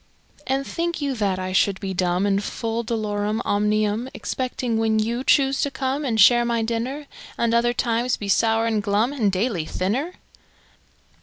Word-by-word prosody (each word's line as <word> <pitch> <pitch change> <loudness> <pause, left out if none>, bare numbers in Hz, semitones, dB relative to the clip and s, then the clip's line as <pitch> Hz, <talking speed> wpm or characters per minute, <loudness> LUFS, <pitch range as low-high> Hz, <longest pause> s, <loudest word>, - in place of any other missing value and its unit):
And 270 +1 0
think 340 +2 -3
you 285 -2 -1
that 200 -3 0
I 185 0 -4
should 195 0 +2
be 195 -1 -4
dumb, 180 +1 0
And 200 0 +1
full 225 +1 -3
dolorum 215 -1 -2
omnium, 210 +3 0
Excepting 250 -3 -2
when 220 -1 +2
you 230 +4 -1
choose 270 -1 +3
to 285 - +1
come 275 +1 -2
And 225 -4 0
share 240 +4 +7
my 235 -1 0
dinner? 240 +6 -3 0.3
At 230 -1 +1
other 235 +1 +3
times 240 0 0
be 205 - -6
sour 225 +3 +2
and 220 -2 0
glum 210 +6 +1
And 220 -8 +1
daily 190 -3 -1
thinner? 240 - -2
225 Hz, 170 wpm, -23 LUFS, 205-255 Hz, 0.3 s, share